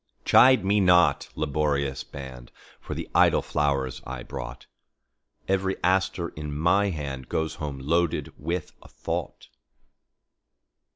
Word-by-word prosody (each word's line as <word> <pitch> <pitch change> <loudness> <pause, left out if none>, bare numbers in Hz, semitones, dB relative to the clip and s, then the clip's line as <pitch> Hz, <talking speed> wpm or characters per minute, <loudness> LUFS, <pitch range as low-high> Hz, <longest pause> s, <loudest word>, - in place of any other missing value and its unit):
Chide 130 -5 +6
me 100 +2 +3
not, 90 -2 +4
laborious 70 -2 -1
band, 65 -3 -10 0.3
For - - -6
the - - -5
idle - - +4
flowers 70 -4 -1
I 65 -1 -6
brought; 60 -3 -7 0.8
Every 95 0 0
aster 95 -1 +1
in 75 -1 -6
my 100 +6 +3
handGoes 75 -1 -4
home 75 -3 -5
loaded 80 +5 0
with 85 +3 -4
a - - -15
thought. - - -5
75 Hz, 115 wpm, -26 LUFS, 70-90 Hz, 0.8 s, Chide